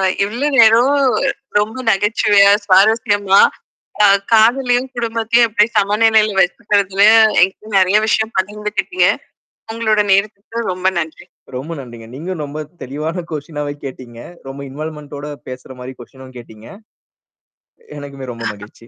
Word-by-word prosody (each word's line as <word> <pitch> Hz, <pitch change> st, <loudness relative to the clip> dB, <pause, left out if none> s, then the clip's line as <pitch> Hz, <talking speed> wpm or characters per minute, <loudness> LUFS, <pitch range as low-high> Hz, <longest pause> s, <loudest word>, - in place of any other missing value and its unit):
ஆ 190 Hz, -, +1 dB, 0.2 s
இவ்ளோ 245 Hz, +8 st, -2 dB
நேரோம் 235 Hz, +5 st, +5 dB, 0.6 s
ரொம்ப 220 Hz, +3 st, -4 dB
நகைச்சுவையா, 205 Hz, 0 st, +3 dB, 0.2 s
சுவாரஸ்யமா, 205 Hz, 0 st, +3 dB, 0.6 s
அ -, -, +6 dB, 0.2 s
காதலையும், 245 Hz, +3 st, +3 dB
குடும்பத்தையும் 230 Hz, 0 st, +1 dB
எப்பிடி 215 Hz, 0 st, +2 dB
சமநிலையில 215 Hz, 0 st, +2 dB
வச்சுக்கிறதுல 195 Hz, +1 st, 0 dB, 0.4 s
என்கிட்ட 195 Hz, +4 st, -1 dB
நெறைய 190 Hz, +3 st, +3 dB
விஷயம் 220 Hz, +1 st, 0 dB
பகிர்ந்துக்கிட்டீங்க. 210 Hz, -, -1 dB, 0.6 s
உங்களோட 220 Hz, -2 st, 0 dB
நேரத்துக்கு 205 Hz, +3 st, -1 dB
ரொம்ப 185 Hz, +1 st, -1 dB
நன்றி. 160 Hz, +1 st, -6 dB, 0.3 s
ரொம்ப 150 Hz, +6 st, -6 dB
நன்றிங்க. 120 Hz, -3 st, -11 dB
நீங்க 170 Hz, +7 st, -6 dB
ரொம்ப 150 Hz, +2 st, -6 dB, 0.2 s
தெளிவான 155 Hz, +7 st, -5 dB
கொஸ்டினாவே 150 Hz, -1 st, -5 dB
கேட்டீங்க. 125 Hz, -3 st, -10 dB, 0.3 s
ரொம்ப 135 Hz, +1 st, -9 dB
இன்வால்மென்டோட 150 Hz, 0 st, -8 dB, 0.2 s
பேசுறமாரி 130 Hz, 0 st, -10 dB
கொஸ்டினும் 130 Hz, +1 st, -14 dB
கேட்டீங்க. 110 Hz, -2 st, -14 dB, 1.3 s
எனக்குமே 140 Hz, -3 st, -8 dB
ரொம்ப 115 Hz, 0 st, -8 dB
மகிழ்ச்சி. 105 Hz, +3 st, -15 dB
195 Hz, 110 wpm, -16 LUFS, 145-220 Hz, 1.3 s, அ